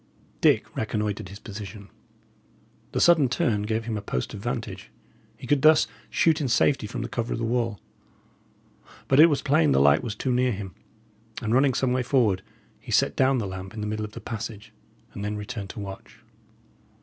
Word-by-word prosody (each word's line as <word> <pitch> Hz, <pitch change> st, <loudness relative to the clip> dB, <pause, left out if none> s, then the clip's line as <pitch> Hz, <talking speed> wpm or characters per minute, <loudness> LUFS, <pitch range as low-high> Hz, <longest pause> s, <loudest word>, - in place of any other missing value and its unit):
Dick -, -, +3 dB
reconnoitred 105 Hz, -3 st, -2 dB
his 100 Hz, -, -9 dB
position. 105 Hz, -1 st, -9 dB, 1.0 s
The -, -, -1 dB
sudden 160 Hz, -7 st, +5 dB
turn 120 Hz, -8 st, +1 dB
gave 110 Hz, +2 st, -2 dB
him 115 Hz, -2 st, -2 dB
a -, -, -4 dB
post 65 Hz, -11 st, -3 dB
of 105 Hz, -, -6 dB
vantage. 120 Hz, +1 st, -5 dB, 0.5 s
He -, -, -10 dB
could 140 Hz, +2 st, +2 dB
thus 155 Hz, +1 st, +6 dB, 0.2 s
shoot 160 Hz, -1 st, +2 dB
in 140 Hz, -, 0 dB
safety 120 Hz, 0 st, +2 dB
from -, -, -5 dB
the -, -, -3 dB
cover 120 Hz, 0 st, -3 dB
of -, -, -2 dB
the 115 Hz, -, -2 dB
wall. 115 Hz, -3 st, -1 dB, 1.3 s
But 135 Hz, -, +4 dB
it 160 Hz, -, +10 dB
was 145 Hz, -4 st, 0 dB
plain 80 Hz, -, +3 dB
the 65 Hz, -, +4 dB
light 70 Hz, +1 st, +5 dB
was 110 Hz, -3 st, -4 dB
too 130 Hz, -, -2 dB
near 125 Hz, 0 st, +2 dB
him, 95 Hz, -2 st, -6 dB, 0.7 s
and, 110 Hz, 0 st, -2 dB
running 130 Hz, 0 st, +3 dB
some 130 Hz, -2 st, +1 dB
way 130 Hz, -, +1 dB
forward, 120 Hz, -7 st, +2 dB, 0.4 s
he -, -, -10 dB
set -, -, +2 dB
down 135 Hz, 0 st, +3 dB
the 115 Hz, -, -1 dB
lamp 95 Hz, +2 st, -7 dB
in 110 Hz, -, -5 dB
the -, -, -3 dB
middle 110 Hz, 0 st, -3 dB
of 105 Hz, 0 st, -7 dB
the -, -, -8 dB
passage, 110 Hz, -1 st, -7 dB, 0.4 s
and 100 Hz, -, -6 dB
then 105 Hz, +1 st, -3 dB
returned 105 Hz, -1 st, -6 dB
to -, -, -8 dB
watch. 100 Hz, -1 st, -9 dB
110 Hz, 195 wpm, -25 LUFS, 105-125 Hz, 1.3 s, it